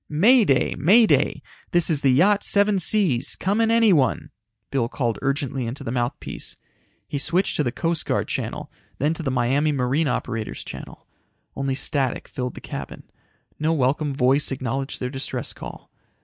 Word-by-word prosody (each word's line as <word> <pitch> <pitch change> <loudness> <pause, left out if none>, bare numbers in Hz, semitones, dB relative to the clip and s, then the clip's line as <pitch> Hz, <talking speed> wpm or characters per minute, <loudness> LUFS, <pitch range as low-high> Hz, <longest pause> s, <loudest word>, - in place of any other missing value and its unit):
"May 220 - +5
Day, 135 -5 +2
May 215 +9 +6
Day! 145 -3 +1 0.3
This 175 -2 +5
is 155 -4 +2
the 135 - +3
Yacht 195 +10 +4
Seven 200 -1 +4
Seas. 160 - +2
Come 200 +4 0
in 225 - +2
anyone!" 205 - +3 0.4
Bill 120 -4 0
called 120 -5 -2
urgently 135 -3 -2
into 120 +5 -6
the 115 - -4
mouthpiece. 120 -1 -4 0.5
He 145 - -3
switched 180 +6 +1
to 150 - +2
the 120 - -1
Coast 165 +4 -2
Guard - - 0
channel, - - -4 0.3
then 150 +4 +1
to 165 - -6
the 145 - -2
Miami 130 +4 +1
Marine 140 +3 0
operators 115 -3 -3
channel. - - -10 0.5
Only 135 -1 -2
static 135 -2 -1
filled 125 -1 -5
the - - -9
cabin. - - -7 0.6
No 155 +2 +1
welcome 145 +1 0
voice 135 +2 +2
acknowledged 135 +1 -3
their 125 0 -3
distress 135 -1 -4
call. - - -10
140 Hz, 165 wpm, -23 LUFS, 130-170 Hz, 0.6 s, May